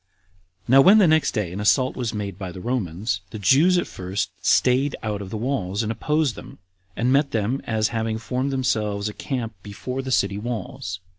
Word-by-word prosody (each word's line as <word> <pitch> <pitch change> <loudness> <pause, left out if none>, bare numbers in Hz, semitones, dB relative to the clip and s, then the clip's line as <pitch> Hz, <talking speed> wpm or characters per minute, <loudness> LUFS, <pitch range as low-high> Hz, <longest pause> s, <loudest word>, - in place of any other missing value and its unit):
5. - - -18
Now 135 +2 +8
when 195 +9 +7
the 205 - +6
next 155 -2 +3
day 105 -6 -1
an 95 - -5
assault 105 +5 +2
was 120 -4 -2
made 100 -3 -5
by 95 -2 -5
the 95 - -9
Romans, 105 -2 -2
the 110 - -7
Jews 145 - +4
at 175 - +1
first 95 0 -4
staid 130 +3 +3
out 105 -2 -2
of 95 - -7
the 110 - -4
walls 105 -4 -1
and 110 - -2
opposed 150 +3 0
them, - - -11 0.4
and 125 +2 +1
met 140 +1 +3
them, 115 +5 -1
as 110 0 0
having 115 -1 -2
formed 130 +4 -2
themselves 105 -6 -1
a - - -8
camp 120 -3 -4
before 125 +7 -5
the 130 - -6
city 100 -5 +1
walls. 105 -5 -5
115 Hz, 205 wpm, -23 LUFS, 100-130 Hz, 0.4 s, Now